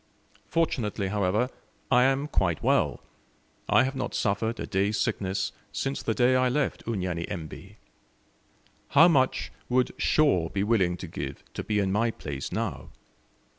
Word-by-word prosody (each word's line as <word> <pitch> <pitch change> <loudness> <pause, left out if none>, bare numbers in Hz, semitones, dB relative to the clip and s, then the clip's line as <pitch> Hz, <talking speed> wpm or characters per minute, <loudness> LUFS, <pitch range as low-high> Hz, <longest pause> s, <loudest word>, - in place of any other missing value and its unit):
Fortunately, 110 -11 0
however, 105 +5 +1 0.4
I 125 0 +6
am 135 +2 +1
quite 90 - 0
well; - - +1 0.7
I - - +5
have 135 +1 -1
not 130 -2 -3
suffered 110 +3 0
a - - -3
day's 100 +2 0
sickness 95 0 -1 0.2
since 135 0 -2
the 110 - -1
day 125 +1 +4
I 130 0 +3
left 145 +3 -1
Unyanyembe. 90 -6 -4 1.1
How 160 +5 +7
much 135 -6 +2 0.2
would 125 0 +2
Shaw 95 - +3
be 100 - -1
willing 95 -5 +2
to 90 - -7
give 70 -4 -6
to - - -4
be 105 - -1
in 100 -2 +1
my 115 +4 +2
place 70 -10 -6
now? - - -3
105 Hz, 145 wpm, -27 LUFS, 95-130 Hz, 1.1 s, How